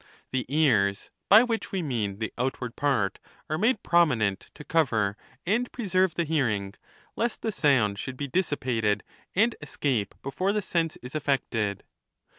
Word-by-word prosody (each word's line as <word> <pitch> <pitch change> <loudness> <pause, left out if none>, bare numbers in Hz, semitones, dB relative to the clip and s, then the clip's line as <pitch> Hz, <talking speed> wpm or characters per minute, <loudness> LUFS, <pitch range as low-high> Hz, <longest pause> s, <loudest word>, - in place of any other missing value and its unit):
The 130 -3 -1
ears 110 -10 +2 0.2
(by 215 +4 +9
which 230 -2 -2
we 190 -3 -1
mean 110 -9 -2
the 110 +1 -4
outward 125 -1 -3
part) 130 -10 0 0.3
are 155 - +1
made 220 +1 +2
prominent, 120 - +2
to - - -10
cover 115 -12 +1 0.3
and 230 +7 +1
preserve 190 -6 +1
the 170 - 0
liearing, 110 -11 0 0.4
lest 235 0 -2
the 220 - 0
sound 120 - +2
should 130 +4 -5
be 145 - -3
dissipated 125 - 0 0.3
and 225 +4 +3
escape 135 -7 -1
before 180 +9 -1
the 210 - 0
sense 165 -3 0
is 125 - -8
affected. 125 -9 -1
140 Hz, 150 wpm, -27 LUFS, 110-175 Hz, 0.4 s, by